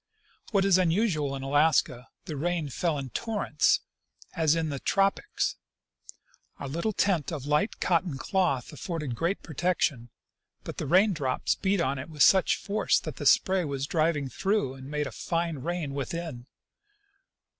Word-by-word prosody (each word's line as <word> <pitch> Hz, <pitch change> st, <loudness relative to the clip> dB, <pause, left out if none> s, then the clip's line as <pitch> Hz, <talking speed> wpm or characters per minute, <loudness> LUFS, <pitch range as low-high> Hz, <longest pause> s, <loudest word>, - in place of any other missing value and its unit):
What 195 Hz, -3 st, +2 dB
is 190 Hz, -2 st, +5 dB
unusual 165 Hz, -6 st, +1 dB
in 135 Hz, -, -6 dB
Alaska, 145 Hz, -3 st, +2 dB, 0.2 s
the 155 Hz, -, -5 dB
rain 165 Hz, 0 st, -1 dB
fell 160 Hz, +3 st, -1 dB
in 135 Hz, -3 st, -5 dB
torrents, 205 Hz, -, +1 dB, 0.5 s
as 160 Hz, -1 st, +3 dB
in 160 Hz, -1 st, -1 dB
the 140 Hz, -2 st, -4 dB
tropics. 195 Hz, -, 0 dB, 1.0 s
Our 140 Hz, -, -6 dB
little 170 Hz, +10 st, -1 dB
tent 185 Hz, -7 st, 0 dB
of 145 Hz, -5 st, -5 dB
light 150 Hz, +8 st, 0 dB
cotton 170 Hz, -4 st, +1 dB
cloth 145 Hz, -4 st, 0 dB
afforded 150 Hz, -2 st, -4 dB
great 170 Hz, +10 st, -2 dB
protection, 155 Hz, -7 st, -1 dB, 0.5 s
but -, -, -7 dB
the 150 Hz, -, -3 dB
rain 190 Hz, +7 st, +4 dB
drops 135 Hz, -6 st, 0 dB
beat 195 Hz, 0 st, 0 dB
on 135 Hz, -4 st, 0 dB
it 135 Hz, +5 st, -7 dB
with 150 Hz, -2 st, +2 dB
such 190 Hz, -2 st, +5 dB
force 210 Hz, +2 st, +1 dB
that -, -, -7 dB
the -, -, 0 dB
spray 190 Hz, -1 st, +4 dB
was 140 Hz, -3 st, -3 dB
driven 155 Hz, -2 st, 0 dB
through 190 Hz, -, 0 dB
and 135 Hz, 0 st, -10 dB
made 150 Hz, 0 st, -1 dB
a -, -, -5 dB
fine 165 Hz, -3 st, -2 dB
rain 165 Hz, 0 st, -3 dB
within. 140 Hz, -2 st, -5 dB
160 Hz, 155 wpm, -28 LUFS, 140-180 Hz, 1.0 s, is